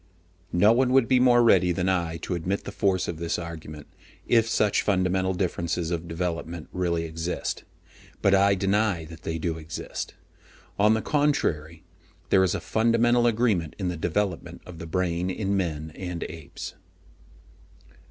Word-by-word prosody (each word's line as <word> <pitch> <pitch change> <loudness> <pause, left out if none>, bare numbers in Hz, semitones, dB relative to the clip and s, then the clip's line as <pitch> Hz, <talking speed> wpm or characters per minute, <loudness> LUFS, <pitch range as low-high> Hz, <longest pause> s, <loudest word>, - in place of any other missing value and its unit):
No 100 +5 +5
one 125 +2 +3
would 130 -3 +5
be 130 -1 +4
more 120 -1 +5
ready 90 -6 +5
than 90 +1 -1
I 85 -3 0
to - - -2
admit 90 +3 -2
the - - -6
force 95 -2 +1
of 85 - -4
this 85 0 -1
argument, 80 -3 -8 0.4
if 115 -1 +3
such 105 -3 +2
fundamental 95 -1 +1
differences 85 -2 -2
of 85 0 -3
development 85 -1 -4
really 85 -2 0
exist. 80 +2 -4 0.5
But 100 - +3
I 100 0 +5
deny 100 -3 +1
that 80 0 -11
they 80 - -3
do 80 0 -2
exist. 80 0 -6 0.6
On 105 +2 +5
the 110 - -2
contrary, 85 - 0 0.5
there 95 - +6
is 95 - +1
a - - -2
fundamental 115 +1 +2
agreement 110 -9 +1
in 95 -3 -2
the 90 - -3
development 90 +2 -2
of 85 -2 -10
the 85 - -7
brain 90 +1 -1
in 100 +1 -1
men 80 -4 -2
and 90 -2 -5
apes. 80 -4 -8
90 Hz, 160 wpm, -26 LUFS, 85-105 Hz, 0.6 s, there